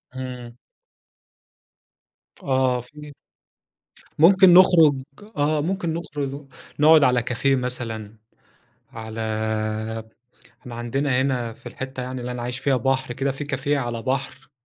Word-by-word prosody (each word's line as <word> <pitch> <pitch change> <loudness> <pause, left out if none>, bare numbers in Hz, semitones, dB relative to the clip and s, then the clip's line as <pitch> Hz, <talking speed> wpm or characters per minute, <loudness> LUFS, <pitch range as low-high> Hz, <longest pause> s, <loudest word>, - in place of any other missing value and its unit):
إمم. 125 -2 -7 1.9
آه، 130 -2 +1
في 150 +4 -12 1.1
ممكن 185 +2 +7
نخرج 165 -6 +6 0.4
آه. 150 +1 +1
ممكن 170 0 -2
نخرُج 145 -4 -5 0.3
نقعُد 155 0 +7
على 125 -2 +3
كافيه 125 +3 0
مثلًا، 115 -4 -4 0.8
على 110 0 -7 1.4
إحنا 120 -2 -9
عندنا 125 +3 0
هنا 125 -4 -1
في - - -25
الحتّة 130 -1 -6
يعني 130 0 -5
اللي 125 +1 -4
أنا 125 -1 -5
عايش 125 +1 -4
فيها 135 0 +1
بحر 130 -1 -1
كده، 135 +2 -1
في 135 +2 -6
كافيه 145 0 -1
على 120 -3 -3
بحر 135 +1 -4
130 Hz, 120 wpm, -23 LUFS, 125-145 Hz, 1.9 s, ممكن